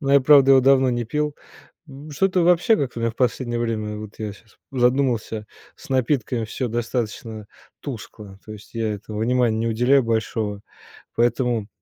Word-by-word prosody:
но 140 -2 0
я 140 - +7
правда 135 0 +6
его 135 - +7
давно 135 0 +4
не 120 -1 -1
пил, 150 +5 -2 0.5
м, 140 +2 -11
что-то 185 +4 +1
вообще 175 +6 +4
как-то 125 -4 -3
у - - -4
меня 115 0 0
в - - -23
последнее 120 -1 -1
время, 110 -2 -2
вот 105 0 -9
я 105 -1 -4
щас 105 +1 -22
задумался, 125 -4 0 0.3
с - - -15
напитками 130 -3 0
всё 125 +3 -3
достаточно 115 -2 -4 0.3
тускло, 105 -6 -9
то 110 - -9
есть 105 +2 -14
я 110 -2 -1
этому 105 +1 -7
внимания 120 -1 +1
не 115 +1 -1
уделяю 125 +4 +3
большого, 110 -2 -2 0.5
поэтому 120 -2 0
120 Hz, 175 wpm, -22 LUFS, 110-135 Hz, 0.5 s, я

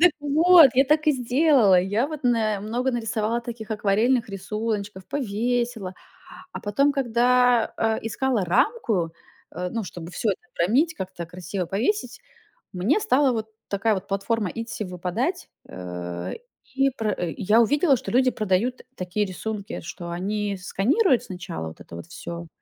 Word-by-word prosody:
Так 350 -2 +7
вот, 315 +1 +7
я 270 - +5
так 305 +2 +2
и 305 - +6
сделала, 250 - +4
я 205 +7 0
вот 305 -1 -7
на 220 -5 +1
много 245 +5 -1
нарисовала 225 -1 -1
таких 235 -2 -8
акварельных 220 +4 +2
рисуночков, 200 0 -4
повесила. 240 -5 -2 0.6
А - - -6
потом, 275 +8 +2
когда, 245 -2 +3
э, 225 -1 +1
искала 225 0 0
рамку, 185 - +1 0.4
э, 180 +2 -3
ну, 230 -2 -3
чтобы 175 -1 -8
всё 220 - 0
это 190 - -3
обромить, 260 - +2
как-то 185 - -6
красиво 180 +2 -5
повесить, 240 - -1 0.5
мне 200 - +2
стала 290 -10 +3
вот 220 -2 -3 0.2
такая 205 +2 +1
вот 195 -1 -4
платформа 200 0 -1
Etsy 230 -1 -5
выпадать, 185 - -3 0.2
э, 90 -1 -6 0.4
и 270 0 +3
пр 220 -5 -2 0.2
я 215 +3 +4
увидела, 285 +5 +3
что - - -6
люди 255 +1 +4
продают 215 +4 0
такие 185 +2 -1
рисунки, 205 +2 -5
что 170 +1 -7
они 200 +3 -2
сканируют 250 - +2
сначала 180 - -6
вот 80 - -10
это 85 - -11
вот 85 0 -9
всё, 170 - -7
220 Hz, 150 wpm, -24 LUFS, 190-255 Hz, 0.6 s, Так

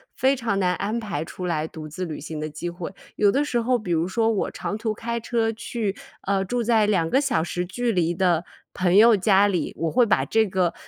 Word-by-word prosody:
非 265 +1 +3
常 230 -5 -1
难 180 -2 +2
安 210 +5 -2
排 205 -10 -3
出 180 - -7
来 160 -2 -1
独 155 -1 -9
自 170 +5 -5
旅 155 -3 -6
行 155 +1 -6
的 155 0 -3
机 155 +3 -5
会。 175 0 -6 0.3
有 205 - +4
的 280 +7 +2
时 250 -5 0
候 245 +2 +2
比 210 -6 -5
如 165 0 +1
说 225 +4 +1
我 210 - -1
长 205 - -4
途 220 0 -2
开 235 +2 -3
车 230 -1 0
去， 225 -2 -3 0.3
呃， 195 0 0
住 240 +5 -1
在 220 -2 +3
2 180 -6 +1
个 265 - +3
小 270 - +1
时 175 +1 -3
距 240 +6 -1
离 175 -4 +1
的 175 -2 +1 0.3
朋 180 0 +1
友 220 +1 +7
家 195 +1 +4
里， 175 -6 -1
我 165 0 -1
会 245 0 +4
把 215 - +2
这 220 0 +2
个 180 -3 0
200 Hz, 250 characters per minute, -24 LUFS, 175-230 Hz, 0.3 s, 友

